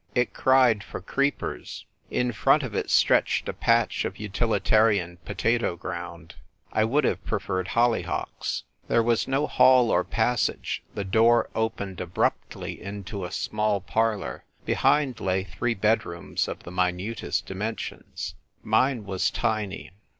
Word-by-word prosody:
It 125 0 +1
cried 125 -6 +4
for - - -7
creepers. 140 +10 -2 0.2
In 125 0 0
front 110 - +3
of - - -5
it - - -2
stretched - - +3
a - - -2
patch - - +2
of - - -4
utilitarian 105 -3 +1
potato 115 -6 0
ground. 85 -2 -7 0.4
I 110 - +3
would 140 +7 +2
have - - 0
preferred 95 0 -2
holly 120 +2 +2
hocks. - - -3 0.2
There 115 - +3
was 115 -1 +1
no 135 +2 +1
hall 130 -5 +5
or 90 - +3
passage: 120 +3 0
the 100 - -2
door 115 +5 +3
opened 105 -5 -2
abruptly 90 0 -2
into 100 -1 -6
a - - -7
small 105 -1 0
parlour; 105 - -1 0.2
behind 135 -6 +2
lay 95 -1 0
three 115 +4 -2
bedrooms 105 -5 0
of - - -6
the 85 - -9
minutest 90 +4 -1
dimensions. 105 +4 -5 0.3
Mine 115 +1 +2
was 95 -2 0
tiny. 105 -3 -2
110 Hz, 135 wpm, -26 LUFS, 95-115 Hz, 0.4 s, hall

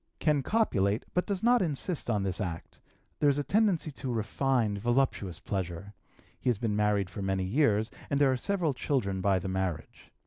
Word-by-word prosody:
Can 150 -3 +2
copulate, 110 - +1
but 180 - 0
does 200 -1 -2
not 245 0 +5
insist 160 -2 -2
on 105 -4 +1
this 95 +1 -2
act; 85 -4 -6 0.4
there 145 - +4
is 140 - +2
a 145 - 0
tendency 195 -5 +1
to 130 -2 -5
refined, 115 -1 0
voluptuous 120 -7 0
pleasure. 95 +1 -4 0.5
He - - 0
has 120 - +2
been 110 -1 -1
married 105 -2 +2
for 90 +3 -7
many 95 -1 0
years, 110 0 +2 0.2
and 140 - +1
there 140 -2 +5
are - - +1
several 175 -1 0
children 100 -8 -1
by 95 0 +3
the 95 - -4
marriage. 95 -4 -4
110 Hz, 185 wpm, -29 LUFS, 95-145 Hz, 0.5 s, not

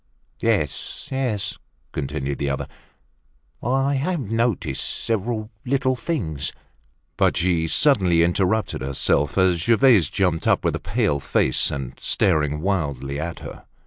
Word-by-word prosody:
"Yes, - - -1
yes," 125 -7 -2 0.3
continued 70 0 -3
the 70 - -1
other, 70 - -3 0.9
"I 135 +3 +1
have 155 +6 -1
noticed 115 - 0
several 110 0 -2
little 130 0 +1
things—" 115 - -2 0.6
But - - +2
she 85 -2 +1
suddenly 95 - +4
interrupted 95 +4 0
herself, 70 +2 +1
as 95 -2 +4
Gervaise 115 - +4
jumped 90 -4 0
up, - - +3
with - - +1
a - - -3
pale 70 -1 0
face, - - +1
and 65 -2 -4
staring 75 -4 +1
wildly 70 -7 -2
at 85 +2 -5
her. - - -10
90 Hz, 125 wpm, -23 LUFS, 75-120 Hz, 0.9 s, suddenly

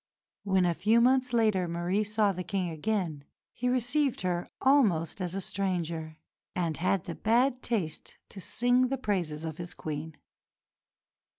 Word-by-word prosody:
When, 190 -2 +2
a 175 - +2
few 210 +7 +3
months 255 +1 +3
later, 215 -6 +2
Marie 175 +5 0
saw 210 -1 +2
the 180 -1 -4
King 185 -3 -2
again, 165 -3 -2 0.3
he 250 +1 -1
received 255 +3 +1
her 180 -2 -1
almost 200 - +3
as 180 0 -3
a 195 - -2
stranger, 170 -5 -2 0.4
and 170 -4 -1
had 185 +1 +1
the 170 - -5
bad 245 +6 +2
taste 185 -10 -3
to 195 - -9
sing 245 +6 +2
the 270 +2 -2
praises 175 -10 -2
of 160 -1 -5
his 175 0 -7
Queen. 155 0 -5
190 Hz, 155 wpm, -29 LUFS, 170-235 Hz, 0.4 s, few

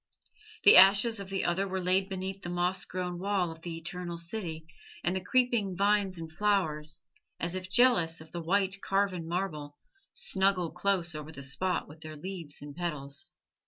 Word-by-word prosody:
The 205 - +9
ashes 200 +4 +7
of 195 -1 -7
the 195 -1 -1
other 190 +3 +1
were 190 0 -2
laid 185 +2 +1
beneath 190 +1 -4
the 175 - -6
moss 180 +1 0
grown 180 -1 -4
wall 190 -3 0
of 165 0 -12
the 165 -1 -5
Eternal 175 +1 -5
City, 170 -2 -4 0.4
and 175 - 0
the 190 - -1
creeping 225 -3 +1
vines 200 -1 +2
and 165 -1 -7
flowers, 160 -5 0 0.4
as 170 +1 -1
if 185 0 -5
jealous 190 -7 +4
of 160 0 -13
the 170 - -5
white, 190 +3 +1
carven 195 -4 0
marble, 155 -5 -3 0.3
snuggle 190 - +1
close 180 -1 0
over 155 0 -7
the 140 -3 -6
spot 180 +7 -1
with 155 +2 -14
their 155 -1 -8
leaves 165 -3 -6
and 145 -1 -9
petals. 140 -5 -5
180 Hz, 175 wpm, -30 LUFS, 165-195 Hz, 0.4 s, The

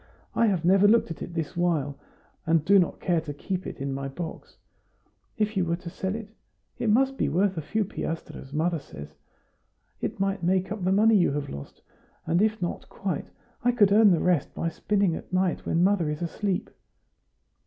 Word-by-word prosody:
I 230 - +3
have 180 -5 0
never 195 +3 +6
looked 225 -4 +4
at 165 - -7
it - - -4
all 170 - -11
this 165 +1 -3
while, 160 -5 0 0.5
and 160 -2 +3
do 200 +1 +6
not 175 - 0
care 170 -3 +1
to 150 -3 -7
keep 185 +4 -4
it - - -6
in 135 0 -2
my 135 0 -3
box; 160 +4 -7 0.8
if 215 -1 0
you 190 - +2
were 170 0 0
to 170 -1 -9
sell 190 +3 -3
it? 225 -2 -6 0.5
It 235 -2 0
must 270 +5 +2
be - - +1
worth 190 +4 +1
a 160 - -3
few 215 +8 -1
piastres, 165 -6 -6
mother 165 +3 0
says. 75 - -10 0.9
It - - -4
might 195 -1 0
make 185 +2 +1
up 215 -3 -4
the 185 - +2
money 215 +3 +5
you 180 -7 +4
have 145 -1 -3
lost; 70 0 -9 0.4
and 170 +3 +2
if 220 0 +2
not 175 - -4
quite, 185 -7 -4 0.3
I 245 - +4
could 205 -5 +4
earn 215 +1 +7
the 170 -4 +3
rest 175 -6 +1
by 165 - -1
spinning 195 0 0
at - - -9
night 185 -1 0
when 170 +1 +2
mother 185 -5 +2
is 150 +3 -3
asleep." 190 +2 -2
180 Hz, 205 wpm, -26 LUFS, 165-200 Hz, 0.9 s, earn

